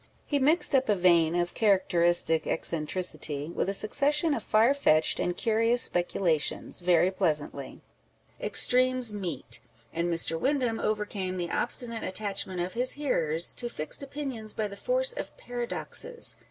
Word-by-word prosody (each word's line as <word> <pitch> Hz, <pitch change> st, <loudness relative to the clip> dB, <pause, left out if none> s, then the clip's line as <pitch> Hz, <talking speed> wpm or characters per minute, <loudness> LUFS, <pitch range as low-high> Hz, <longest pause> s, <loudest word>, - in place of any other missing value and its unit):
He 285 Hz, -, 0 dB
mixed 305 Hz, +5 st, +3 dB
up 265 Hz, -3 st, +2 dB
a 210 Hz, -, +4 dB
vein 170 Hz, -3 st, +3 dB
of 175 Hz, 0 st, -1 dB
charac 200 Hz, -4 st, +3 dB
teristic 170 Hz, -2 st, +2 dB
eccentricity 155 Hz, -2 st, -2 dB
with 185 Hz, -, -2 dB
a -, -, -1 dB
succession 295 Hz, -, +3 dB
of -, -, -2 dB
far 225 Hz, +5 st, +3 dB
fetched 160 Hz, -, +2 dB
and 175 Hz, 0 st, -2 dB
curious 230 Hz, +2 st, +2 dB
speculations, 175 Hz, -3 st, -1 dB
very 180 Hz, 0 st, +3 dB
pleasantly. 150 Hz, -7 st, -3 dB, 0.6 s
Extremes 255 Hz, -2 st, +4 dB
meet; 175 Hz, -, -4 dB, 0.3 s
and 170 Hz, +1 st, -1 dB
Mr. 165 Hz, -1 st, 0 dB
Windham 255 Hz, -, 0 dB
overcame 205 Hz, -3 st, -3 dB
the 175 Hz, -1 st, -4 dB
obstinate 230 Hz, -2 st, +1 dB
attachment 190 Hz, -2 st, -4 dB
of 180 Hz, +1 st, -4 dB
his 250 Hz, +2 st, 0 dB
hearers 170 Hz, -, -1 dB
to 240 Hz, -, -4 dB
fixed 155 Hz, -, -3 dB
opinions 270 Hz, -6 st, -6 dB
by 215 Hz, -, -2 dB
the 200 Hz, -, -10 dB
force -, -, 0 dB
of -, -, -7 dB
paradoxes. 245 Hz, -, -2 dB
200 Hz, 145 wpm, -27 LUFS, 175-250 Hz, 0.6 s, a